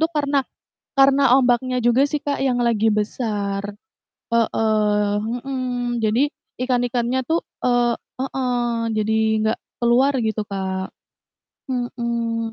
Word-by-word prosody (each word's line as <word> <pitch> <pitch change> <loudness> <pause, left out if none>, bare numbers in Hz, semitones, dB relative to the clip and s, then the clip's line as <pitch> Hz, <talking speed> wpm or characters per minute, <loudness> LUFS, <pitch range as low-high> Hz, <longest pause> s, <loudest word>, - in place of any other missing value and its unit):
itu 320 - +3
karena 285 -1 +1 0.6
karena 275 +1 +5 0.2
ombaknya 250 0 +1
juga 240 +3 +4
sih, 300 -2 -1
Kak, 285 - 0
yang 250 -1 +1
lagi 225 -2 +2
besar, 205 -2 -2 0.7
heeh, 215 -3 +1 0.3
mhm. 265 -1 -2 0.4
Jadi 215 +2 +2 0.4
ikan-ikannya 245 0 0
tuh, 330 +1 +3 0.3
eee 245 -1 +3 0.3
heeh, 245 -3 -1 0.2
jadi 215 0 0 0.3
enggak 220 +1 +1 0.2
keluar 250 +4 +4
gitu, 220 0 -1
Kak, 190 -1 -3 0.8
mhm. 235 -2 -2
235 Hz, 110 wpm, -21 LUFS, 220-255 Hz, 0.8 s, karena